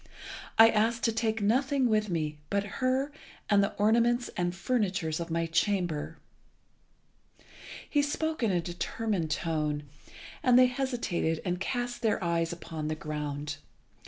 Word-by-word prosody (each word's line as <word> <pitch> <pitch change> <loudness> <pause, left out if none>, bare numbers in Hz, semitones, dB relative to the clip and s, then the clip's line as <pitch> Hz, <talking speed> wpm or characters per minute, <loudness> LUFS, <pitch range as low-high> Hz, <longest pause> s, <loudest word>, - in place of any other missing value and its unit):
I 225 0 +9
ask 225 +2 +1
to 230 - +3
take 225 -1 -1
nothing 260 +4 +2
with 215 -2 +1
me 155 -3 -2
but 200 0 +1 0.2
her 260 +3 +1 0.4
and 200 -1 +5
the 200 - -1
ornaments 235 +3 +2
and 175 0 -1
furniture 195 -6 0
of 165 +2 -3
my 165 0 0
chamber." 165 -2 0 1.7
He 290 - +2
spoke 315 +2 -2
in 225 - +2
a 180 -3 +1
determined 175 +1 -2
tone, 150 -2 -1 0.6
and 250 -1 +5
they 255 - +8
hesitated 245 - -1
and 180 -1 -1
cast 245 +4 -3
their 225 -3 +2
eyes 170 -1 0
upon 160 -2 -5
the 155 - -1
ground. 150 -1 -4
200 Hz, 140 wpm, -29 LUFS, 165-240 Hz, 1.7 s, I